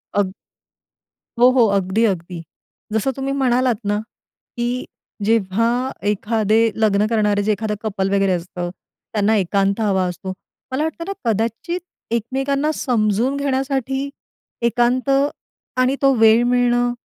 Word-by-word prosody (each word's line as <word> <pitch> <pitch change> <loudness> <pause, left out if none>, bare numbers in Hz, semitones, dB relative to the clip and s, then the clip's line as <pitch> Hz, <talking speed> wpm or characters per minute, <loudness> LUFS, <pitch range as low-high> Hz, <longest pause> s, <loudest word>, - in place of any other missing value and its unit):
अग 195 -2 +1 1.1
हो, 245 +1 +7
हो, 255 -3 +5
अगदी, 195 +4 0
अगदी. 180 -4 -2 0.5
जसं 220 +5 +1
तुम्ही 270 0 -3
म्हणालात 250 -1 +2
ना, 205 0 +1 0.6
की 240 +1 -1 0.4
जेव्हा 220 0 +2 0.4
एखादे 215 +1 +1 0.2
लग्न 205 -1 +3
करणारे 210 -2 +1
जे 215 - +1
एखादं 210 +1 -1
कपल 195 -3 -1
वगैरे 195 -1 +2
असतं 175 0 -4 0.4
त्यांना 215 0 +2
एकांत 195 +2 +1
हवा 195 -3 +2
असतो. 185 +1 -5 0.4
मला 265 +4 0
वाटतं 320 +1 -3
ना, 395 - -2 0.2
कदाचित 230 - -1 0.3
एकमेकांना 270 +6 0
समजून 235 +2 +1
घेण्यासाठी 270 0 -1 0.6
एकांत 245 +3 +1 0.7
आणि 255 +1 +3
तो 275 -1 +5
वेळ 225 +1 +6
मिळणं 245 0 +2
225 Hz, 125 wpm, -20 LUFS, 205-255 Hz, 1.1 s, हो